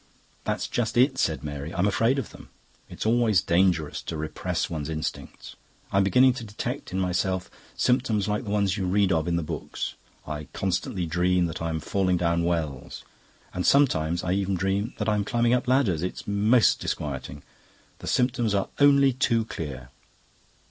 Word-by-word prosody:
"That's -, -, -1 dB
just 120 Hz, -1 st, -1 dB
it," 130 Hz, +1 st, +4 dB
said 80 Hz, -2 st, 0 dB
Mary. 75 Hz, +1 st, -5 dB
"I'm 90 Hz, -, +1 dB
afraid 115 Hz, +6 st, +2 dB
of 135 Hz, -, -4 dB
them. -, -, -14 dB, 0.4 s
It's -, -, -6 dB
always 110 Hz, -5 st, +3 dB
dangerous 85 Hz, -5 st, +1 dB
to 80 Hz, -, -5 dB
repress 80 Hz, +3 st, -2 dB
one's 80 Hz, -2 st, -4 dB
instincts. 80 Hz, -1 st, -5 dB, 0.4 s
I'm 100 Hz, 0 st, +3 dB
beginning 125 Hz, +7 st, +5 dB
to 125 Hz, -1 st, -7 dB
detect 120 Hz, +5 st, -5 dB
in 95 Hz, -, -2 dB
myself 95 Hz, 0 st, -1 dB, 0.3 s
symptoms 120 Hz, -5 st, +1 dB
like 105 Hz, +2 st, -1 dB
the 105 Hz, -, -7 dB
ones 100 Hz, -1 st, +1 dB
you 95 Hz, -2 st, -1 dB
read 100 Hz, +1 st, +2 dB
of 80 Hz, -1 st, +1 dB
in 85 Hz, -, +1 dB
the 85 Hz, -, 0 dB
books. 75 Hz, -, -5 dB, 0.3 s
I 75 Hz, 0 st, -5 dB
constantly 95 Hz, -1 st, -2 dB
dream 90 Hz, +2 st, +1 dB
that 80 Hz, -1 st, -5 dB
I'm 80 Hz, -1 st, -2 dB
falling 90 Hz, +2 st, 0 dB
down 85 Hz, -1 st, +1 dB
wells; 80 Hz, -6 st, -3 dB, 0.5 s
and 90 Hz, -, -2 dB
sometimes 85 Hz, -, +3 dB
I 90 Hz, -, -1 dB
even 100 Hz, 0 st, 0 dB
dream 95 Hz, +5 st, -1 dB
that 105 Hz, -, -2 dB
I'm 105 Hz, -1 st, +1 dB
climbing 120 Hz, +3 st, +1 dB
up 125 Hz, 0 st, +1 dB
ladders. 120 Hz, -, +2 dB
It's 90 Hz, -, -4 dB
most 105 Hz, +4 st, +3 dB
disquieting. 70 Hz, +1 st, -4 dB, 0.6 s
The -, -, -9 dB
symptoms 125 Hz, -4 st, +1 dB
are 100 Hz, -, 0 dB
only 140 Hz, -2 st, +5 dB
too 115 Hz, -3 st, +1 dB
clear." 65 Hz, -, -6 dB
95 Hz, 170 wpm, -26 LUFS, 85-115 Hz, 0.6 s, beginning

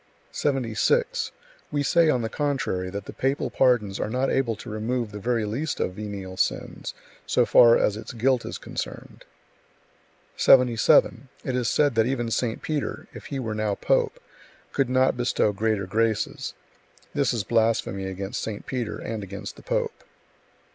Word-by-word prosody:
76. 145 Hz, -, 0 dB, 0.4 s
We 145 Hz, -1 st, 0 dB
say, 165 Hz, +2 st, +4 dB
on 125 Hz, -5 st, +2 dB
the -, -, 0 dB
contrary, 130 Hz, -9 st, -1 dB
that 100 Hz, +1 st, -6 dB
the -, -, -8 dB
papal 135 Hz, +2 st, -1 dB
pardons 120 Hz, -7 st, +2 dB
are -, -, -1 dB
not 130 Hz, +3 st, 0 dB
able 125 Hz, -4 st, +1 dB
to 120 Hz, -, -11 dB
remove 115 Hz, +1 st, -2 dB
the 105 Hz, -, -7 dB
very 115 Hz, 0 st, 0 dB
least 135 Hz, +9 st, -2 dB
of 90 Hz, -, -1 dB
venial 100 Hz, -2 st, -6 dB
sins, -, -, -2 dB, 0.3 s
so -, -, +3 dB
far 115 Hz, -1 st, +7 dB
as 105 Hz, -, +1 dB
its 110 Hz, -, -7 dB
guilt 125 Hz, +1 st, +1 dB
is -, -, -5 dB
concerned. -, -, -7 dB, 1.1 s
77. 125 Hz, +1 st, +5 dB
It 130 Hz, -, -2 dB
is 125 Hz, -2 st, +1 dB
said 145 Hz, -3 st, +3 dB
that 115 Hz, 0 st, +3 dB
even 120 Hz, -3 st, -1 dB
St. 115 Hz, -1 st, -1 dB
Peter, 150 Hz, -2 st, -3 dB
if -, -, -10 dB
he 140 Hz, -, -4 dB
were 115 Hz, -5 st, -3 dB
now 105 Hz, -2 st, -1 dB
Pope, -, -, +1 dB, 0.5 s
could 135 Hz, -3 st, +1 dB
not 130 Hz, 0 st, +3 dB
bestow 120 Hz, -3 st, +1 dB
greater 105 Hz, -1 st, 0 dB
graces; 110 Hz, +2 st, -1 dB, 0.6 s
this 140 Hz, -3 st, +2 dB
is 115 Hz, -5 st, -1 dB
blasphemy 110 Hz, -4 st, +1 dB
against 95 Hz, +1 st, -4 dB
St. 110 Hz, -2 st, -5 dB
Peter 120 Hz, -5 st, -3 dB
and 110 Hz, -1 st, -5 dB
against 100 Hz, 0 st, -7 dB
the -, -, -14 dB
pope. -, -, -2 dB
115 Hz, 160 wpm, -25 LUFS, 105-130 Hz, 1.1 s, far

